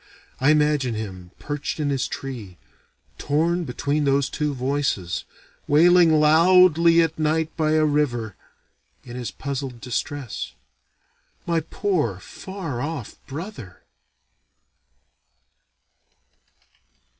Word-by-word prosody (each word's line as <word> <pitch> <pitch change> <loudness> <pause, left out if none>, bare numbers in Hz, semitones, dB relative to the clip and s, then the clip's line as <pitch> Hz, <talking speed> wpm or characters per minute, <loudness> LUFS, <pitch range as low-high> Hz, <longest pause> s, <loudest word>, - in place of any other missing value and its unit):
I 135 - +3
imagine 150 -5 +2
him, 95 -5 -6
perched 145 +1 -4
in 145 -2 0
his 135 -2 0
tree, 115 -10 -7 0.6
torn 165 +4 0
between 145 +3 -1
those 140 0 +1
two 150 -1 -1
voices, 130 -9 -1 0.4
wailing 165 +1 +5
loudly 170 +1 +6
at 160 0 -3
night 155 +1 0
by 155 -1 +1
a 155 0 +4
river, 120 -9 0 0.7
in 120 -1 -9
his 125 -3 -4
puzzled 135 +3 -5
distress. 130 +1 -4 0.9
My 170 -1 +1
poor 160 - -1
far 165 - -6
off 145 -6 -5
brother! 140 - -8
145 Hz, 100 wpm, -23 LUFS, 125-160 Hz, 0.9 s, loudly